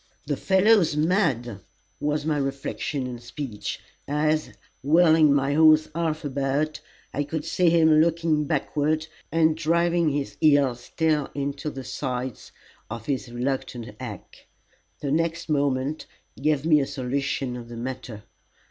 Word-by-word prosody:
"The -, -, -1 dB
fellow's 190 Hz, -4 st, +3 dB
mad!" 150 Hz, -, +1 dB, 0.4 s
was 150 Hz, +1 st, -1 dB
my 155 Hz, -2 st, +1 dB
reflection 135 Hz, 0 st, -3 dB
and 125 Hz, -2 st, -6 dB
speech, 120 Hz, -2 st, -5 dB, 0.3 s
as, 155 Hz, +2 st, +1 dB, 0.3 s
wheeling 160 Hz, 0 st, +5 dB
my 140 Hz, 0 st, +2 dB
horse 155 Hz, 0 st, +5 dB
half 160 Hz, -2 st, -2 dB
about, 140 Hz, +2 st, -1 dB, 0.3 s
I 145 Hz, -, 0 dB
could 150 Hz, +1 st, -4 dB
see 175 Hz, +1 st, +2 dB
him 160 Hz, -2 st, +5 dB
looking 165 Hz, -2 st, +1 dB
backward, 155 Hz, +1 st, 0 dB, 0.3 s
and 160 Hz, -1 st, +3 dB
driving 170 Hz, +1 st, +2 dB
his 145 Hz, -1 st, -3 dB
heels 140 Hz, -5 st, +4 dB
still 150 Hz, +3 st, 0 dB
into 140 Hz, +1 st, -3 dB
the 135 Hz, -2 st, -7 dB
sides 130 Hz, -2 st, -4 dB, 0.4 s
of 115 Hz, 0 st, -6 dB
his 130 Hz, -3 st, -3 dB
reluctant 125 Hz, -1 st, -3 dB
hack. 115 Hz, -7 st, -9 dB, 0.5 s
The 140 Hz, -, -2 dB
next 165 Hz, +2 st, -1 dB
moment 140 Hz, 0 st, 0 dB, 0.3 s
gave 150 Hz, 0 st, 0 dB
me 155 Hz, -2 st, +5 dB
a 135 Hz, -, -1 dB
solution 135 Hz, -1 st, -2 dB
of 120 Hz, -1 st, -8 dB
the 120 Hz, -, -8 dB
matter. 120 Hz, -3 st, -6 dB
145 Hz, 135 wpm, -25 LUFS, 130-155 Hz, 0.5 s, wheeling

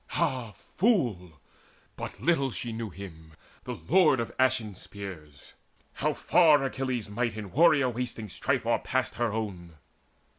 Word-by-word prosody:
Ah 120 Hz, -6 st, -1 dB, 0.2 s
fool! 115 Hz, -, +1 dB, 0.6 s
but -, -, -7 dB
little 165 Hz, -5 st, +2 dB, 0.2 s
knew 115 Hz, -1 st, -4 dB
she 100 Hz, +2 st, -9 dB
him, 80 Hz, -4 st, -12 dB, 0.3 s
the -, -, -4 dB
lord 160 Hz, -6 st, +5 dB
Of 115 Hz, -, -3 dB
ashen 130 Hz, -5 st, +2 dB
spears, 90 Hz, -7 st, -10 dB, 0.4 s
how -, -, -1 dB
far 155 Hz, -5 st, +5 dB
Achilles' 130 Hz, -4 st, -2 dB
might 110 Hz, +2 st, -2 dB
In 105 Hz, -3 st, -6 dB
warrior 150 Hz, -3 st, +5 dB
wasting 120 Hz, -2 st, -4 dB
strife 95 Hz, -, -1 dB
o'erpassed -, -, 0 dB
her 120 Hz, -2 st, 0 dB
own! 95 Hz, -6 st, -5 dB
115 Hz, 135 wpm, -28 LUFS, 100-130 Hz, 0.6 s, lord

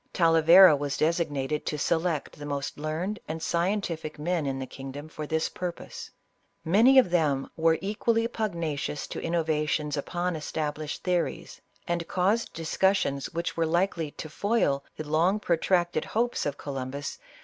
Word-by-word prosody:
Talavera 165 Hz, +1 st, +7 dB
was 140 Hz, 0 st, -3 dB
designated 150 Hz, -3 st, 0 dB
to 150 Hz, -, -1 dB
select 160 Hz, -1 st, -1 dB
the 145 Hz, -, -6 dB
most 140 Hz, 0 st, -4 dB
learned 165 Hz, +8 st, -3 dB
and 160 Hz, +1 st, -4 dB
scientific 170 Hz, -2 st, -1 dB
men 160 Hz, 0 st, -1 dB
in 135 Hz, -1 st, -2 dB
the 135 Hz, -, -4 dB
kingdom, 135 Hz, +3 st, -8 dB
for 155 Hz, -1 st, -7 dB
this 160 Hz, +1 st, 0 dB
purpose; 180 Hz, -1 st, -6 dB, 0.6 s
many 225 Hz, +11 st, +5 dB
of 245 Hz, -9 st, +6 dB
them 150 Hz, -6 st, +1 dB
were 165 Hz, 0 st, +3 dB
equally 225 Hz, +3 st, +1 dB
pugnacious 170 Hz, -11 st, -3 dB
to -, -, -6 dB
innovations 155 Hz, -3 st, 0 dB
upon 175 Hz, +5 st, -2 dB
estab 155 Hz, -1 st, -3 dB
lished 155 Hz, -1 st, -5 dB
theories, 180 Hz, -2 st, -2 dB, 0.3 s
and 170 Hz, -1 st, -1 dB
caused 200 Hz, +6 st, +1 dB
discussions 165 Hz, -3 st, 0 dB
which 170 Hz, +1 st, -3 dB
were 165 Hz, -1 st, +1 dB
likely 170 Hz, -1 st, 0 dB
to 155 Hz, -, -8 dB
foil 155 Hz, -5 st, 0 dB
the 155 Hz, -, -5 dB
long 170 Hz, +7 st, +2 dB
protracted 175 Hz, -2 st, +1 dB
hopes 235 Hz, -6 st, 0 dB
of 145 Hz, -, -3 dB
Columbus, 140 Hz, 0 st, -4 dB
ISABELLA -, -, -12 dB
OF -, -, -33 dB
CASTILE. -, -, -26 dB
165 Hz, 160 wpm, -27 LUFS, 150-180 Hz, 0.6 s, Talavera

